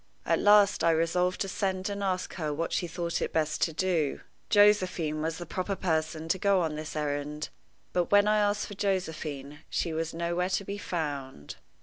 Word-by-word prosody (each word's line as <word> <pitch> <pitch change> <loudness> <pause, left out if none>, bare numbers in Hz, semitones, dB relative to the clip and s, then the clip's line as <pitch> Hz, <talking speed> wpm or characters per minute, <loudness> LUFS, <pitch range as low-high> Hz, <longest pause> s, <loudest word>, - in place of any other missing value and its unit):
At - - +2
last 205 -1 +5
I 170 - +5
resolved 165 +3 +1
to 195 - 0
send 190 -1 -1
and 200 0 -4
ask 185 -2 -1
her 155 -4 -2
what 165 +3 -2
she 175 - 0
thought 170 0 -3
it - - -1
best 155 -1 0
to 165 - +2
do. 160 -3 0 0.3
Josephine 185 -7 +3
was 160 +1 -2
the 175 - -6
proper 185 +4 -2
person 160 -3 -1
to 190 - +1
go 200 -1 +3
on 160 -2 -1
this 155 +1 -6
errand; 150 0 -3 0.4
but 175 -1 +1
when 205 0 +6
I 215 0 +4
asked 205 0 +1
for - - -8
Josephine, 155 -8 -3
she 165 - -1
was 165 0 -2
nowhere 170 +2 -1
to 190 +1 0
be 200 +1 -5
found. 140 - -4
170 Hz, 195 wpm, -29 LUFS, 155-190 Hz, 0.4 s, when